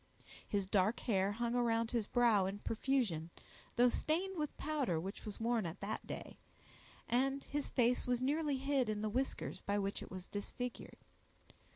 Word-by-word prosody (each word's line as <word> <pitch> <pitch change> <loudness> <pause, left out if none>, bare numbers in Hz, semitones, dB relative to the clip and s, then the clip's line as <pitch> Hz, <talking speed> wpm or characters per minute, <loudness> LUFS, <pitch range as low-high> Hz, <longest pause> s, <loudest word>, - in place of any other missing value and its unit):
His 200 -2 0
dark 200 +4 +2
hair 200 -3 +2
hung 235 +2 -1
around 230 -2 +2
his 230 -4 0
brow 225 -6 +4
in 195 +1 -3
profusion, 215 - 0 0.5
though 245 +1 +6
stained 355 +9 0
with 300 -3 -3
powder 280 - 0
which 190 +5 -6
was 210 -2 -6
worn 230 -4 +1
at 170 +4 -7
that 200 +2 -3
day, - - -6 0.7
and 270 +3 +2
his 290 -1 -2
face 245 0 +2
was 250 -1 +2
nearly 290 +2 +1
hid 270 -3 +1
in 210 0 -1
the 215 - +1
whiskers 260 +5 -2
by 200 0 0
which 200 0 -1
it - - -8
was 185 0 -7
disfigured. 240 +4 -5
235 Hz, 170 wpm, -37 LUFS, 205-265 Hz, 0.7 s, though